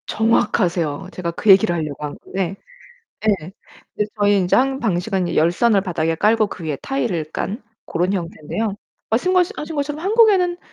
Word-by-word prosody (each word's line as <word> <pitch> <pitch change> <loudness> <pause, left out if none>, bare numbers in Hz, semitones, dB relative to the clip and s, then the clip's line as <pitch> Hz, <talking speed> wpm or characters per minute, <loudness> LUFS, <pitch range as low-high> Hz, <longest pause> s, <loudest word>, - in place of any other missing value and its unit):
정확하세요. 180 -8 +1
제가 170 -2 -3
그 205 - -2
얘기를 190 -2 +6
하려고 150 -3 -4
한 145 - -6
건데 190 -1 -4 0.7
예. 185 -4 0 0.4
이제 210 - 0
저희 205 0 +4
인제 180 -2 +1
한 265 +1 +2
방식은 190 -3 -1
이 - - -3
열선을 195 +7 +3
바닥에 165 -4 -1
깔고 215 +5 +3
그 180 - -8
위에 150 -3 -2
타일을 180 - -2
깐 210 +6 -4 0.2
고런 180 +3 -1
형태인데요. 190 +3 -3 0.4
말씀거시 360 +10 +2
하신 310 +2 -6
것처럼 290 +1 -2
한국에는 390 -5 +4
195 Hz, 360 characters per minute, -20 LUFS, 170-240 Hz, 0.7 s, 얘기를